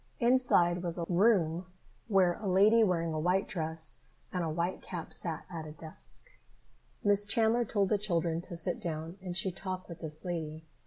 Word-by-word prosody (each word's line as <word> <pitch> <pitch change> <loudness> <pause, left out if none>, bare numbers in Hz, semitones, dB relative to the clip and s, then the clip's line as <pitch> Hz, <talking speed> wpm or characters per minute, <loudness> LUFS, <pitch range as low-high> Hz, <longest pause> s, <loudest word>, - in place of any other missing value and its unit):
Inside 235 -9 +4
was 175 -1 -1
a 170 - -2
room 180 -3 +2 0.4
where 190 -5 +4
a 215 - -4
lady 205 +5 +5
wearing 170 -5 +1
a 155 - -1
white 180 +4 +1
dress 160 -2 -3 0.3
and 180 -2 0
a 165 - -1
white 170 +3 -2
cap 175 -3 -6
sat 165 -3 -3
at 165 -3 -6
a 150 - -8
desk. 160 - -9 0.7
Miss 205 0 +4
Chandler 225 +3 +3
told 200 -2 +1
the 210 - +2
children 170 -4 0
to 175 -1 -6
sit 175 +1 +1
down 165 +2 -4
and 180 -2 -4
she 190 0 +1
talked 185 0 -5
with 170 -2 -9
this 155 0 -3
lady. 160 -3 -4
175 Hz, 180 wpm, -31 LUFS, 165-195 Hz, 0.7 s, lady